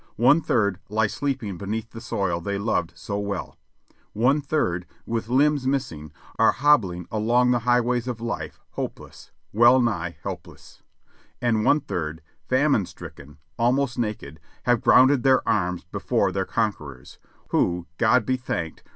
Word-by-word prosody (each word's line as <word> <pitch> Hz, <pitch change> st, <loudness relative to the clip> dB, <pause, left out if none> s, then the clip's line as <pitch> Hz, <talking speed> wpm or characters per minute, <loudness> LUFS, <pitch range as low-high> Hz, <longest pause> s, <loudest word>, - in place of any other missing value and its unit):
One 135 Hz, +8 st, +5 dB
third 100 Hz, -, +1 dB
lie 110 Hz, +1 st, +2 dB
sleep 135 Hz, +4 st, -2 dB
ing 100 Hz, -5 st, -5 dB
beneath 110 Hz, +3 st, -4 dB
the 115 Hz, -, -9 dB
soil 95 Hz, -6 st, -2 dB
they 100 Hz, +3 st, -3 dB
loved 100 Hz, -5 st, -1 dB
so 100 Hz, +3 st, -4 dB
well; 100 Hz, -2 st, -4 dB, 0.6 s
one 130 Hz, +7 st, +2 dB
third, 90 Hz, -, -1 dB, 0.2 s
with 115 Hz, -1 st, -3 dB
limbs 140 Hz, +1 st, +2 dB
missing, 85 Hz, -, -2 dB, 0.3 s
are -, -, +5 dB
hobbling 100 Hz, -, +2 dB
along 120 Hz, +3 st, +2 dB
the 125 Hz, -, +2 dB
highways 120 Hz, 0 st, +2 dB
of 120 Hz, -3 st, -4 dB
life 115 Hz, 0 st, -5 dB
hopeless, -, -, -7 dB, 0.2 s
well 120 Hz, +4 st, +6 dB
nigh 90 Hz, -8 st, -1 dB
helpless; -, -, -9 dB, 0.6 s
and 115 Hz, -3 st, +1 dB
one 150 Hz, +6 st, +3 dB
third, 80 Hz, -, -4 dB, 0.3 s
famine 130 Hz, -, +2 dB
stricken, 70 Hz, +1 st, -12 dB, 0.2 s
almost 125 Hz, +2 st, +1 dB
naked, 105 Hz, -10 st, -4 dB, 0.2 s
have 120 Hz, -2 st, +2 dB
grounded 130 Hz, +1 st, +5 dB
their 130 Hz, 0 st, +3 dB
arms 90 Hz, -4 st, 0 dB
before 95 Hz, +2 st, -1 dB
their 95 Hz, 0 st, -1 dB
conquerors, 75 Hz, -, -4 dB, 0.3 s
who, 85 Hz, -1 st, +1 dB
God 120 Hz, 0 st, +3 dB
be 130 Hz, +2 st, 0 dB
thanked! 85 Hz, -10 st, -4 dB
110 Hz, 145 wpm, -24 LUFS, 90-125 Hz, 0.6 s, well